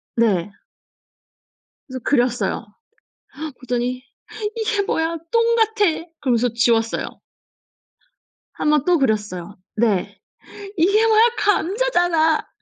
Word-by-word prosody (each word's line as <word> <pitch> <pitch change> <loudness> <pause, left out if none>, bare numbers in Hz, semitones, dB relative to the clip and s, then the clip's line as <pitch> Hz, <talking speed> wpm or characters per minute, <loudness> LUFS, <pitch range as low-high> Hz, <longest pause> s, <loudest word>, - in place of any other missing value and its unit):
네. 205 -5 +1 1.3
그래서 260 -3 -7
그렸어요. 245 -2 0 0.7
그랬더니 255 -4 -4 0.5
"이게 435 -2 0
뭐야 330 -3 -1
똥같아." 445 -7 +2
그러면서 245 -3 +1
지웠어요. 230 -1 +1 1.5
1 - - -1
번 300 -3 +3
또 360 -1 +4
그렸어요. 205 -6 -2 0.2
네. 215 -4 0 0.6
"이게 400 +7 +3
뭐야. 440 -1 +5 0.2
감자잖아." 350 -6 +1
300 Hz, 200 characters per minute, -21 LUFS, -, 1.5 s, 뭐야